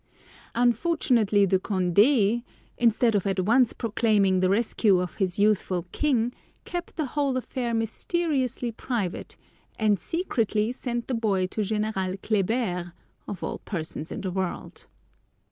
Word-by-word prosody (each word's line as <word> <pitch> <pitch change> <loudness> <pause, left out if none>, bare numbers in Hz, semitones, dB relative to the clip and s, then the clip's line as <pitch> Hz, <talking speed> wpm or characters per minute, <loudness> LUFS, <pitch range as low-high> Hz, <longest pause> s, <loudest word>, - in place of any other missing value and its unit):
Unfortunately 240 - +3
De 190 0 +2
Condé, 205 +5 +3 0.3
instead 230 0 +3
of 200 -1 +1
at 190 -1 0
once 235 +5 +3
proclaiming 210 -4 +1
the 185 0 +2
rescue 205 -2 +2
of 180 -2 -3
his 185 -3 0
youthful 200 -4 +1
king, 245 -5 +1 0.3
kept 350 -1 -5
the 310 - -1
whole 275 0 -1
affair 250 -1 -3
mysteriously 255 - 0
private, 220 -5 -4 0.4
and 210 -3 +2
secretly 225 - -1
sent 240 -2 -4
the 260 - -2
boy 205 -5 +1
to 200 +4 -3
General 210 -3 -1
Kléber, 195 -4 -1 0.3
of 195 -4 -6
all - - -3
persons 160 -4 -5
in - - -5
the 190 - -3
world! 185 -1 -4
215 Hz, 130 wpm, -26 LUFS, 190-245 Hz, 0.4 s, Unfortunately